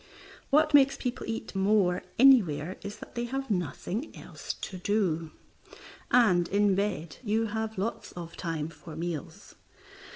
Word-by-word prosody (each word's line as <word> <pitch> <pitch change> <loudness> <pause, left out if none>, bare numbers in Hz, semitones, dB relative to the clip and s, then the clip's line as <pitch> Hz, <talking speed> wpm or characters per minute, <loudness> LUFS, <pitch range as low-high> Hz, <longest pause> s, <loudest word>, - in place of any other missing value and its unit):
What 305 +1 +4
makes 275 -1 +6
people 250 -1 -4
eat 225 - -4
more 195 -2 +2 0.2
anywhere 190 - +5
is 200 +1 -7
that - - -11
they 240 0 -2
have 270 0 -4
nothing 185 - -3
else - - -6
to 185 - -7
do, 175 -5 0 0.8
and 185 -9 +4
in 200 +1 +3
bed 185 -6 -2
you 220 0 +1
have 220 0 -3
lots 205 +5 -3
of 170 -1 -8
time 160 -3 -3
for 165 -1 -11
meals. 170 +3 -6
200 Hz, 140 wpm, -29 LUFS, 175-225 Hz, 0.8 s, makes